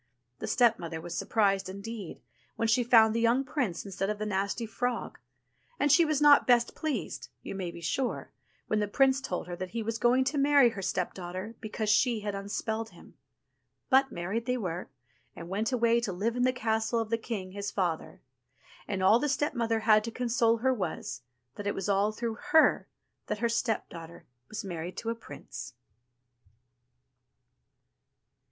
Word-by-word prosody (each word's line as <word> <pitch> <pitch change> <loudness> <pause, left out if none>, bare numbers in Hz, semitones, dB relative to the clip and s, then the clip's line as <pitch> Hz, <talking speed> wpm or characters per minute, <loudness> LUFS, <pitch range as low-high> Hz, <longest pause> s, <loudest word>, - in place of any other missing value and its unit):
The - - -4
stepmother 195 -10 +2
was 170 +1 -6
surprised 195 -2 +1
indeed 200 0 -7 0.3
when 230 - 0
she 245 +2 +3
found 225 -2 +6
the 230 - 0
young 235 +3 +3
prince 255 - -2
instead 195 0 -3
of 210 - -1
the 215 - -3
nasty 200 +3 -1
frog, 245 +2 -3 0.6
and 290 - +3
she 335 +3 +6
was 305 -2 +1
not 295 -1 +6
best 240 -1 +4
pleased, 310 -2 -4
you - - -6
may 190 -3 -4
be 170 - -9
sure, 240 +10 -2 0.3
when 215 - 0
the 210 - 0
prince 270 +5 +3
told 180 -11 -3
her 175 0 -6
that 185 +1 -5
he 225 - -1
was 225 +1 -3
going 250 +2 +4
to 275 +2 -1
marry 280 -3 +6
her 205 -4 -6
stepdaughter 185 +2 -3
because 215 0 -4
she 225 +1 +3
had 205 -1 -3
unspelled 220 +3 -3
him. - - -17 0.8
But 265 0 +5
married 200 +8 -3
they 250 0 +1
were, 180 -5 -4 0.5
and 170 0 -9
went 210 +5 -1
away 235 -1 +3
to 235 -4 -2
live 210 +6 -1
in 245 0 +2
the 255 - +4
castle 225 -2 0
of 225 -1 -3
the 230 - +2
king, 200 -5 -5
his 200 +1 -4
father; 175 -6 -2 0.7
and 190 -2 -2
all 210 +5 +6
the 295 - 0
step 295 +2 0
mother 230 -3 0
had 215 -1 +5
to - - -3
console 235 -1 +2
her 260 +3 +2
was, 160 - -4 0.4
that 205 - -4
it 205 - -1
was 195 - -3
all 200 +1 +2
through 225 +1 -4
her 315 - +5 0.4
that - - -2
her 235 - 0
stepdaughter 205 -8 -3 0.2
was 215 +1 -5
married 175 0 -5
to 230 - -2
a - - 0
prince. 140 -10 -9
220 Hz, 180 wpm, -29 LUFS, 195-245 Hz, 0.8 s, found